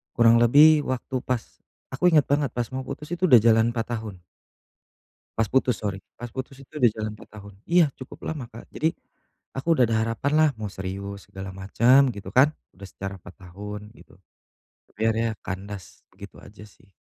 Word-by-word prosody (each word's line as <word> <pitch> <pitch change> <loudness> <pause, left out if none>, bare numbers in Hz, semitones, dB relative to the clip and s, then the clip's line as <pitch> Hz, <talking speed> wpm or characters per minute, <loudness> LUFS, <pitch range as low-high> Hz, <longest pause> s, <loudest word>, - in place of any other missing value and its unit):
Kurang 115 -1 +5
lebih 150 +5 +7
waktu 130 +1 -3
pas 125 -4 -2 0.5
aku 180 +7 +3
ingat 155 -4 +4
banget 145 -1 +2
pas 120 -1 0
mau 130 - -2
putus 150 +1 -7
itu 180 0 +1
udah 125 - +9
jalan 115 +1 +4
4 120 0 -3
tahun. 105 -5 -8 1.2
Pas 115 - +2
putus 130 -2 +2
sorry, 100 -2 -3 0.2
pas 120 0 -7
putus 130 +1 -6
itu 135 - -18
udah 120 - +6
jalan 110 -1 -3
4 - - -15
tahun. 100 0 -11 0.2
Iya 175 -1 +6
cukup 130 - -10
lama 150 -6 -5
Kak, 115 - -12
jadi 160 - +1 0.7
aku 135 +5 -6
udah 125 - +5
ada 115 - 0
harapan 115 +5 -2
lah 155 -1 +5
mau 105 -2 -4
serius 100 +1 -6
segala 95 0 -7
macem 120 +8 +4
gitu 100 - -8
kan, 140 +4 +5 0.2
udah 100 +1 -10
secara 95 0 -7
4 - - -14
tahun 105 +3 -9
gitu - - -18 0.8
tapi - - -20
akhirnya 115 0 +1 0.2
kandas 95 -3 -7
begitu - - -12
aja 105 +1 -13
sih. 100 - -24
115 Hz, 185 wpm, -25 LUFS, 100-130 Hz, 1.2 s, udah